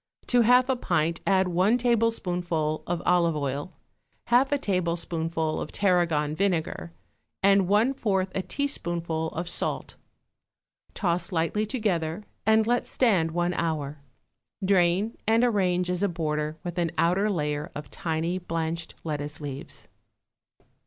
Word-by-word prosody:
To 245 -1 +4
half 250 +2 +5
a 265 - +2
pint 165 -7 0
add 190 -1 +3
one 185 +7 +3
tablespoonful 180 -10 0
of 175 0 -2
olive 170 -2 +3
oil, 145 +3 -3 0.5
half 245 +4 +3
a 285 - +3
tablespoonful 170 - -1
of - - -5
tarragon 170 -6 +1
vinegar 160 - -1 0.5
and 195 -1 +5
one 215 +7 +3
fourth 195 -7 0
a 190 - -1
teaspoonful 170 - -2
of 170 +2 -5
salt; - - -3 1.0
toss 170 -3 0
lightly 180 +5 0
together 195 -6 -1 0.2
and 220 0 +5
let 240 +1 +1
stand 195 -10 +2
one 175 +2 0
hour; 150 -4 -2 0.7
drain, 190 +3 +2
and 225 +2 +4
arrange 185 -6 +2
as 180 0 -1
a 200 - +2
border 155 -2 -2
with 175 -1 -4
an 170 -1 +1
outer 190 +5 +2
layer 150 -5 -2
of 150 -1 -7
tiny 170 0 -2
blanched 165 -1 -3
lettuce 150 -1 -4
leaves. 140 -2 -7
175 Hz, 130 wpm, -26 LUFS, 160-205 Hz, 1.0 s, half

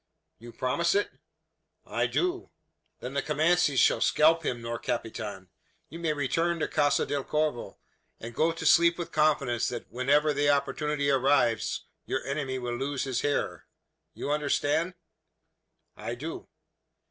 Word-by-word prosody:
"You 120 +1 -11
promise 170 +10 0
it?" 205 - +1 0.7
"I - - 0
do." 360 0 -1 0.5
"Then 125 +2 -6
the 140 - 0
Comanches 155 -1 +2
shall 115 - +4
scalp 160 +7 +4
him, 125 -5 -2
nor 115 0 -4
capitan. 105 -5 -4 0.4
You 165 - -9
may 165 -2 0
return 165 +5 0
to 155 - -1
Casa 145 -2 +2
del 140 -1 -2
Corvo, 150 -5 -2 0.4
and 115 +1 -8
go 160 +7 +2
to 165 - -6
sleep 170 0 +5
with 175 - -5
confidence 145 -6 +2
that 120 - -6
whenever 145 +5 +2
the 145 +1 +2
opportunity 145 0 +1
arrives, 135 -4 +2 0.2
your - - -2
enemy 140 -2 -2
will 120 -1 -3
lose 135 +2 -2
his 130 -3 -1
hair. 145 0 -2 0.5
You 145 - -3
understand?" 150 +3 0 1.0
"I - - -5
do." - - -7
145 Hz, 145 wpm, -28 LUFS, 125-155 Hz, 1.0 s, sleep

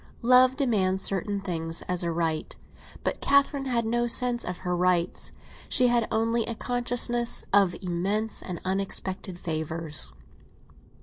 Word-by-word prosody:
Love 255 +2 +5
demands 195 -9 0
certain 200 +1 0
things 165 -4 -2
as 180 -1 +1
a 170 -1 -1
right; 165 -1 -2 0.5
but - - -2
Catherine 280 0 +2
had 240 -3 0
no 240 +1 0
sense 240 0 +4
of 180 0 -5
her 180 0 0
rights; 180 -1 0 0.4
she 250 -2 +4
had 240 -2 +1
only 230 +1 +1
a 230 - -4
consciousness 240 0 +1
of 195 -3 +4
immense 195 +5 -2
and 180 -3 -6
unexpected 190 0 -2
favours. 160 - -3
200 Hz, 135 wpm, -26 LUFS, 175-240 Hz, 0.5 s, Love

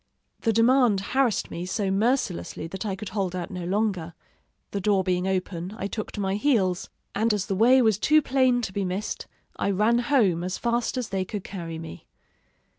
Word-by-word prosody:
The 225 - +1
demand 230 -1 +4
harassed 245 +3 0
me 170 - -4
so 195 +1 -1
mercilessly 210 - 0
that 190 +6 -5
I 195 - -1
could 200 +1 -7
hold 190 -3 -2
out 180 +2 -4
no 180 -2 -5
longer: 185 -4 -1 0.6
the 200 - -2
door 195 -1 +2
being 180 0 0
open, 185 0 -2
I - - -4
took 210 +1 -4
to - - -5
my 190 -1 0
heels; 205 -8 +1 0.2
and 225 +3 +2
as 200 - -2
the - - -2
way 245 +6 +5
was 220 -3 +3
too 305 +7 +5
plain 255 -2 +2
to 190 - -4
be 200 - -1
missed, 190 +3 -3 0.3
I - - 0
ran 215 +5 +3
home 230 - +2
as 180 +1 -3
fast 235 +1 -1
as 250 -3 -2
they 195 -1 -1
could 195 +1 -5
carry 170 -4 -6
me. 160 - -9
200 Hz, 195 wpm, -26 LUFS, 185-230 Hz, 0.6 s, way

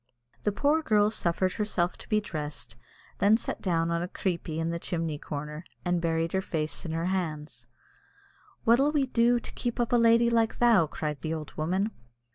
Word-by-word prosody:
The 210 - +1
poor 290 +9 +2
girl 210 -6 +3
suffered 185 -2 0
herself 185 -5 0
to - - -13
be 215 - +3
dressed, 150 - -6
and 120 - -27 0.4
then 210 +2 +5
sat - - -4
down 170 -3 0
on 170 0 0
a 175 - -2
"creepie" 170 -4 -3
in 165 +1 -1
the 170 - -3
chimney 165 -4 -3
corner, 150 +2 -6 0.2
and 175 -1 +1
buried 165 0 0
her 190 - +1
face 155 -4 -3
in 165 - -3
her 165 +1 -1
hands. 160 -5 -3 1.0
"What'll 260 +6 +4
we 290 -3 +2
do 240 -1 +3
to - - -7
keep 240 -1 -3
up 240 +1 0
a - - +6
lady 235 0 +5
like 230 -1 +2
thou?" 230 -9 +5
cried 150 -1 -4
the 160 +2 -3
old 155 -2 -7
woman. 185 +7 -1
180 Hz, 195 wpm, -28 LUFS, 160-225 Hz, 1.0 s, a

